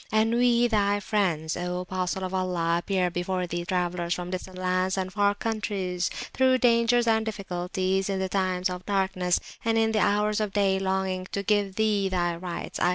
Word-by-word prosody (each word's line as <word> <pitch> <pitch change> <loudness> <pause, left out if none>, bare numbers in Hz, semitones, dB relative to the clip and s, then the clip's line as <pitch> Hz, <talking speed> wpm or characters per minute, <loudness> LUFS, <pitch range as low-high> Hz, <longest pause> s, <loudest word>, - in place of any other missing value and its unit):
And 220 +1 +2
we 240 0 +4
Thy 205 -3 +2
Friends, 180 -7 0
O 180 0 -3
Apostle 185 0 -3
of 185 0 -4
Allah! 175 -3 0
appear 180 -1 0
before 180 +1 -2
Thee, 175 0 -3
Travellers 175 -1 -1
from 180 0 -5
distant 185 0 -6
lands 185 +1 0
and 185 0 -3
far 205 -1 +2
Countries, 200 -5 -2 0.2
through 260 0 +4
Dangers 240 0 +3
and 220 -1 +3
Difficulties, 190 -2 -2
in 195 - 0
the 190 0 -1
Times 185 -1 0
of 180 0 -6
Darkness, 190 -3 +1 0.2
and 225 0 +1
in 225 0 +3
the 220 - +1
Hours 210 +2 +2
of 210 -2 -2
Day, 195 -2 +2
longing 190 -1 -1
to 200 - -1
give 200 -1 +1
Thee 210 -2 +1
Thy 175 -2 0
Rights 175 0 -6
(i. 175 - +3
190 Hz, 185 wpm, -26 LUFS, 180-210 Hz, 0.2 s, we